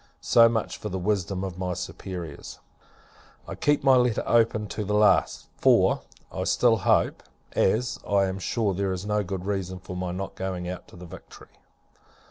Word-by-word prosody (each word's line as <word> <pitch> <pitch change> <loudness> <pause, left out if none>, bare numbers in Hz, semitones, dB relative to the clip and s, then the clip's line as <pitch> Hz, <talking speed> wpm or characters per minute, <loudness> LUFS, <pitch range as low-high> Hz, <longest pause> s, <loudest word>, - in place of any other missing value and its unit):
So 115 0 +5
much 115 -1 -2
for 105 - -5
the 95 - -3
wisdom 95 -1 -1
of 95 -2 -6
my 90 -1 -2
superiors. 85 -6 -7 0.9
I - - -5
keep 145 -1 +1
my 135 -1 +6
letter 125 -3 +1
open 115 -2 +2
to 105 - -4
the 105 +1 -1
last: 105 -1 +3
for, - - +4 0.3
I - - -3
still 120 -2 +3
hope; 95 - +1 0.3
as, 120 +6 +1
I 100 -1 +3
am 95 0 -3
sure, 105 +1 -1
there 95 0 -1
is 95 +2 -5
no 105 0 0
good 95 -1 -5
reason 95 -2 -3
for 90 0 -9
my 90 -1 -3
not 95 +2 -5
going 95 -2 -4
out 90 0 -7
in - - -13
the 90 - -10
Victory. 85 - -13
95 Hz, 180 wpm, -26 LUFS, 90-105 Hz, 0.9 s, my